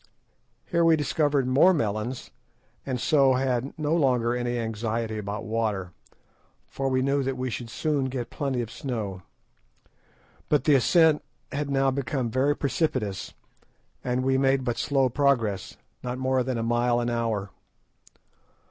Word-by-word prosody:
Here 170 -1 +1
we 165 -1 +6
discovered 145 -2 +1
more 140 +9 +5
melons, 110 0 -2 0.6
and 130 -2 -2
so 135 -1 +4
had 130 0 -1
no 155 +1 0
longer 125 -6 +2
any 120 0 -1
anxiety 110 -1 -2
about 105 +1 -4
water, 105 -5 -2 0.8
for 135 0 -2
we 130 0 +1
knew 140 +1 +1
that 135 -1 -2
we 130 0 -2
should 115 0 -5
soon 145 +1 -1
get 125 -2 -4
plenty 135 -4 -1
of 115 - -8
snow. 105 -8 -4 1.3
But 150 - +3
the 150 - +4
ascent 155 +3 +4 0.3
had 145 0 -2
now 135 -1 +2
become 130 -3 -2
very 135 +4 +2
precipitous, 130 - -2 0.7
and 125 0 -1
we 130 0 +2
made 135 0 +2
but 120 -2 -2
slow 135 -2 +2
progress, 120 -7 0 0.2
not 125 0 -4
more 130 0 +1
than 125 -1 -2
a 115 - -1
mile 120 +1 +2
an 120 0 -1
hour. 110 -4 -1
130 Hz, 150 wpm, -26 LUFS, 115-140 Hz, 1.3 s, we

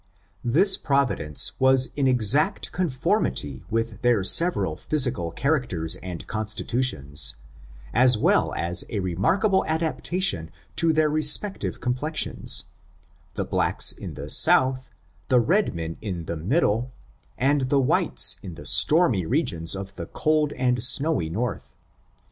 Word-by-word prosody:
This 165 - +4
providence 135 - 0
was 130 0 +3
in 140 -2 0
exact 130 - +1
conformity 125 - -2
with 115 0 -3
their 120 -5 +1
several 170 - +3
physical 125 - 0
characters 120 - -1
and 90 -3 -9
constitutions, 105 - -1 0.3
' - - -20 0.3
as 125 0 +5
well - - +1
as 85 +1 +1
a 105 - -3
remarkable 165 - 0
adaptation 160 - -1 0.3
to 165 -1 +3
their 155 0 +1
respective 155 +7 +1
complexions, 130 +6 -2 0.7
the - - -3
blacks - - +2
in - - -9
the - - -8
south^ 130 0 +3 0.4
the 125 - +3
red 175 - 0
men 80 0 -6
in 90 -6 -6
the 85 - -5
middle, 115 - -1 0.5
and 135 0 0
the 140 - +2
whites 130 - +3
in 90 -4 -9
the 75 - -11
stormy 95 - +3
regions 95 - 0
of 95 0 -9
the 85 -2 -7
cold 155 -1 -1
and 125 -2 -1
snowy 130 - +1
north. 110 +7 -5
125 Hz, 130 wpm, -23 LUFS, 90-150 Hz, 0.7 s, as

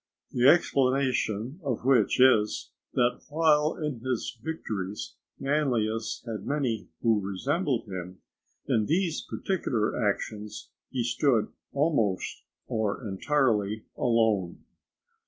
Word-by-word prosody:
The 125 +1 +3
explanation 130 - +2
of 125 -4 -2
which 135 -2 +4
is, 120 -5 +4 0.2
that 125 0 +2
while 155 0 +3
in 150 -6 -3
his 125 0 -2
victories 105 -11 -4 0.3
Manlius 120 -6 0
had 115 -3 -5
many 130 -7 -1
who 110 -3 +3
resembled 130 - -1
him, 90 -1 -6 0.5
in 110 -2 +1
these 170 0 +1
particular 125 - -1
actions 105 +1 -3 0.2
he 125 -3 -1
stood 120 -2 +2 0.2
almost 140 - 0 0.3
or 110 +2 -1
entirely 110 -1 +1
alone. 110 -7 +1
120 Hz, 100 wpm, -28 LUFS, 105-140 Hz, 0.5 s, which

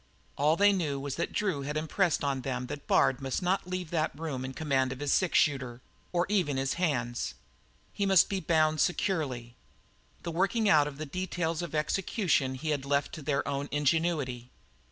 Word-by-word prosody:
All 150 +3 +3
they 205 +2 +5
knew 150 -7 -1
was 140 0 -4
that 170 - -2
Drew 190 -9 -1
had 145 +2 -3
impressed 160 +2 +1
on 135 -2 0
them 125 -1 -3
that 145 +3 -7
Bard 130 - +3
must 135 +5 -2
not 185 +1 0
leave 180 -2 -4
that 155 -3 -1
room 145 -6 -3
in 130 - -4
command 135 -4 +1
of 130 - -6
his 145 -1 0
six 185 -3 +2
shooter 130 -5 +1 0.3
or 175 0 +1
even 180 -9 +1
of - - +1
his 135 0 0
hands. 120 -9 -1 0.6
He 200 - 0
must 190 -3 +6
be 195 - -2
bound 155 -4 +2
securely. 140 - -1 0.7
The 170 - -3
working 195 +6 +1
out 150 -6 +5
of 140 -2 -7
the 155 - -4
details 170 0 -2
of 170 -3 -5
execution 155 - 0
he 155 +5 -4
had 145 -3 -1
left 140 +1 0
to 155 - -6
their 140 -1 -1
own 140 0 -2
ingenuity. 145 -4 0
150 Hz, 195 wpm, -29 LUFS, 135-175 Hz, 0.7 s, must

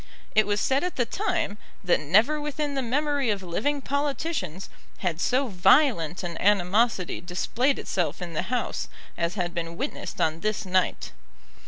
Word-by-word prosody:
It 215 - +4
was 205 0 +1
said 270 +7 +1
at 360 - -2
the 245 - +1
time, 350 - -2 0.2
that 180 - +3
never 215 - +3
within 295 0 -2
the 270 - -1
memory 280 +1 0
of 200 -2 -1
living 275 +12 -1
politicians 280 - -2 0.3
had 175 -3 -2
so 260 +2 +2
violent 185 - +3
an 170 -1 -5
animosity 200 0 +2
displayed 225 +10 0
itself 175 -4 -2
in 175 -2 -6
the 155 - 0
House 250 -1 -2 0.3
as 170 +2 -1
had 175 -3 -2
been 170 -1 -4
witnessed - - -4
on 160 0 +1
this 215 +2 -1
night. 185 - 0
210 Hz, 160 wpm, -26 LUFS, 175-275 Hz, 0.3 s, It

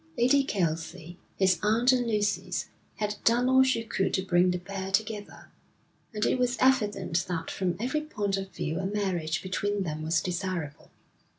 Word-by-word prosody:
Lady 260 +4 +4
Kelsey, 165 -4 -3 0.2
his 185 -3 +3
aunt 225 +4 +4
and 250 -2 +1
Lucy's, 210 -2 -1 0.3
had 210 -1 -2
done 240 +2 +3
all 260 0 +6
she 260 -3 +2
could 210 -3 -1
to 190 - 0
bring 180 -1 +3
the 180 - 0
pair 190 +1 -5
together; 210 0 -2 0.6
and 215 -1 -1
it - - +1
was 245 -1 +1
evident 210 -9 +2
that 165 -2 -3
from 180 -2 -1
every 260 +7 -1
point 210 -10 -2
of 195 0 -4
view 160 -2 -3
a 190 - -2
marriage 185 -6 -1
between 200 +2 -1
them 155 -3 -4
was 160 +1 +1
desirable. 175 -3 -4
195 Hz, 170 wpm, -28 LUFS, 175-230 Hz, 0.6 s, all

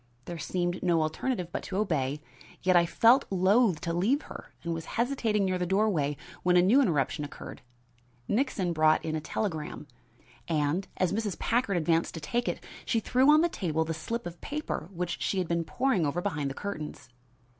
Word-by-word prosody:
There 170 -1 -6
seemed 175 +1 -2
no 170 -3 +2
alternative 175 +4 -2
but - - -3
to 190 - -5
obey, 150 -7 -1 0.4
yet 185 0 +4
I 170 -1 +5
felt 240 +9 +5
loath 195 0 +3
to 170 - -2
leave 220 - +1
her - - -10
and 170 -1 -2
was 165 -1 -5
hesitating 230 -5 +1
near 185 -1 0
the 180 - -1
doorway 180 -8 +1 0.2
when 180 0 +3
a - - +7
new 235 +10 +5
interruption 150 - +1
occurred. 145 - -8 0.7
Nixon 205 -7 0
brought 155 -1 +3
in 160 -1 -1
a 155 - -2
telegram, 160 -5 -3 0.6
and, 160 +3 0
as 185 -1 +1
Mrs. 210 -3 -2
Packard 230 -5 +1
advanced 165 0 +1
to - - -4
take 240 +10 -2
it, - - -3 0.2
she 230 - +1
threw 255 +5 +3
on 305 +1 +7
the 340 - +4
table 160 - -1
the 165 - -2
slip 230 +10 -4
of 175 0 -8
paper 295 - -4
which 180 -1 -4
she 195 - 0
had 185 -2 0
been 170 0 0
poring 190 - +1
over 145 +5 -1
behind 150 -7 -2
the 135 - -6
curtains. 155 -10 -6
180 Hz, 190 wpm, -29 LUFS, 160-215 Hz, 0.7 s, a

